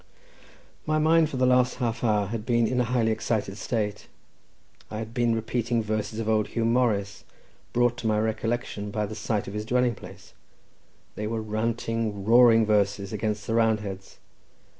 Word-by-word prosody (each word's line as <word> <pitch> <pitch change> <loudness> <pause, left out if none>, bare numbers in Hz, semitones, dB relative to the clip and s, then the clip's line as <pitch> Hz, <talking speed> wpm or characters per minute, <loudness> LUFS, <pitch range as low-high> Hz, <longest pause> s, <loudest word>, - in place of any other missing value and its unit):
My 155 0 +2
mind 160 0 +4
for 135 - -5
the 130 - +3
last 125 0 +3
half 120 -3 -2
hour 105 -3 +2
had 105 +1 -4
been 115 0 +2
in 125 +2 0
a - - +1
highly 115 -2 +1
excited 110 -3 -2
state; 105 -1 -3 0.8
I 105 - -5
had 110 +1 -6
been 120 -1 +1
repeating 115 +1 -1
verses 110 0 -3
of 115 -1 -3
old 110 -1 +2
Huw 115 -1 -2
Morris, 110 -4 0 0.5
brought 120 0 +2
to 120 - -3
my 105 -1 +2
recollection 110 -1 -2
by 105 +1 -2
the 105 - -7
sight 105 -1 -2
of 100 - -6
his 105 0 -3
dwelling 125 +2 +1
place; - - -13 0.8
they 105 - -4
were 115 +1 -2
ranting 110 -1 -2
roaring 115 0 +6
verses, 100 -1 +1
against 105 0 -2
the 115 - -2
Roundheads. 105 -4 -1
110 Hz, 170 wpm, -26 LUFS, 105-120 Hz, 0.8 s, roaring